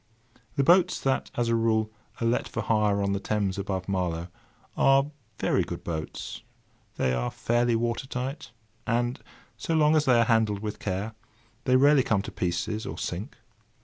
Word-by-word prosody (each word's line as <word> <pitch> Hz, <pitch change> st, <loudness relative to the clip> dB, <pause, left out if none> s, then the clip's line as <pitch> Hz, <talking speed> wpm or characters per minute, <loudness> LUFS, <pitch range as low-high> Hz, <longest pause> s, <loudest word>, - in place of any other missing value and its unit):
The 140 Hz, -, +2 dB
boats 180 Hz, +4 st, +4 dB
that, 135 Hz, -1 st, 0 dB
as 120 Hz, -1 st, 0 dB
a 115 Hz, -, +2 dB
rule, 110 Hz, -1 st, +1 dB, 0.3 s
are 115 Hz, -, -1 dB
let 115 Hz, +1 st, +1 dB
for -, -, -4 dB
hire 105 Hz, -2 st, +2 dB
on 100 Hz, -, 0 dB
the 100 Hz, -, -1 dB
Thames 100 Hz, -2 st, -1 dB
above 95 Hz, -2 st, -3 dB
Marlow, 90 Hz, -3 st, -2 dB, 0.5 s
are 135 Hz, +2 st, +4 dB, 0.3 s
very -, -, +1 dB
good -, -, -5 dB
boats. 80 Hz, -2 st, -5 dB, 0.5 s
They 65 Hz, -, +1 dB
are -, -, -1 dB
fairly 120 Hz, 0 st, +1 dB
water 120 Hz, +3 st, -1 dB
tight; 130 Hz, +2 st, -4 dB, 0.4 s
and 120 Hz, +2 st, 0 dB, 0.4 s
so 165 Hz, -, -1 dB
long 155 Hz, 0 st, +4 dB
as 155 Hz, -1 st, +3 dB
they 125 Hz, -2 st, +5 dB
are 115 Hz, -, +4 dB
handled 110 Hz, -3 st, +2 dB
with 105 Hz, -1 st, -4 dB
care, 100 Hz, +3 st, -3 dB, 0.5 s
they 130 Hz, -2 st, +4 dB
rarely 140 Hz, +2 st, +6 dB
come 105 Hz, -5 st, +1 dB
to -, -, -7 dB
pieces, 90 Hz, +5 st, -2 dB
or -, -, -5 dB
sink. -, -, -5 dB
115 Hz, 175 wpm, -27 LUFS, 100-130 Hz, 0.5 s, rarely